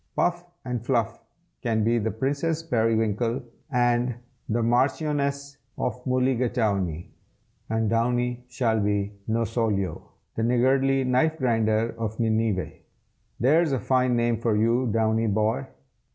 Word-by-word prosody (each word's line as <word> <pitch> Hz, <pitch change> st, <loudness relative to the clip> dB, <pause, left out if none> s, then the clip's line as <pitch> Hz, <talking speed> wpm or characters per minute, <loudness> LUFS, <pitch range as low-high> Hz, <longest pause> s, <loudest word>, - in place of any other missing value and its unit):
"Puff 175 Hz, 0 st, 0 dB, 0.2 s
and 125 Hz, -3 st, -3 dB
Fluff 115 Hz, -2 st, -1 dB, 0.4 s
can 110 Hz, -3 st, 0 dB
be 115 Hz, +2 st, +2 dB
the 110 Hz, +1 st, -1 dB
Princess 145 Hz, +8 st, -1 dB
Perriwinkle 115 Hz, -2 st, 0 dB, 0.3 s
and 120 Hz, -1 st, +2 dB, 0.3 s
the 115 Hz, +1 st, +1 dB
Marchioness 140 Hz, +3 st, 0 dB, 0.2 s
of 125 Hz, 0 st, -3 dB
Mulligatawney, 115 Hz, -9 st, 0 dB, 0.6 s
and 110 Hz, 0 st, 0 dB
Downy 120 Hz, +2 st, 0 dB
shall 115 Hz, -3 st, 0 dB
be 100 Hz, -1 st, 0 dB, 0.2 s
Nosolio, 110 Hz, -5 st, 0 dB, 0.3 s
the -, -, -3 dB
Niggardly 130 Hz, +3 st, +2 dB
Knife 130 Hz, +5 st, +2 dB
Grinder 115 Hz, -4 st, +1 dB
of 110 Hz, 0 st, -4 dB
Nineveh. 110 Hz, -6 st, 0 dB, 0.7 s
There's 150 Hz, +5 st, +3 dB
a 130 Hz, -, +1 dB
fine 125 Hz, +1 st, +2 dB
name 120 Hz, -1 st, +1 dB
for 115 Hz, -2 st, +1 dB
you, 115 Hz, +4 st, +2 dB
Downy, 110 Hz, +1 st, +1 dB
boy!" 110 Hz, +5 st, 0 dB
120 Hz, 120 wpm, -25 LUFS, 110-130 Hz, 0.7 s, There's